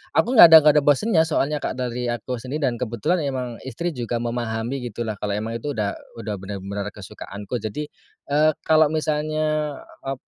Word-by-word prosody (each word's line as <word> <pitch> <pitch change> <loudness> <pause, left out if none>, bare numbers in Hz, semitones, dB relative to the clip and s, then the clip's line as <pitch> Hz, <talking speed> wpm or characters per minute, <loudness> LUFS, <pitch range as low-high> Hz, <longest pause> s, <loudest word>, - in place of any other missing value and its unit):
aku - - +3
nggak - - +13
ada 160 -1 +10
nggak 150 -1 +6
ada - - -4
bosen 145 - +3
ya 160 -4 +4
soalnya 150 -1 0
Kak - - -3
dari 125 -1 -3
aku 120 +1 -3
sendiri 140 +5 -4
dan 120 -3 0
kebetulan 120 - -1
emang 125 -3 -4
istri 170 +8 -3
juga 120 -5 -4
memahami 120 +1 -2
gitu 120 +1 -5
lah 110 -2 -5
kalau 105 -1 -2
emang 115 +2 -3
itu 145 +4 -4
udah 105 -2 -2 0.2
udah 115 -2 -5
bener-bener 100 +1 -5
kesukaanku. 105 +3 -7
Jadi, 115 +8 -5 0.4
eee, 155 +2 +4
kalau 155 -1 +5
misalnya 155 -1 -1 0.2
ap 135 0 -4
125 Hz, 185 wpm, -23 LUFS, 110-150 Hz, 0.4 s, nggak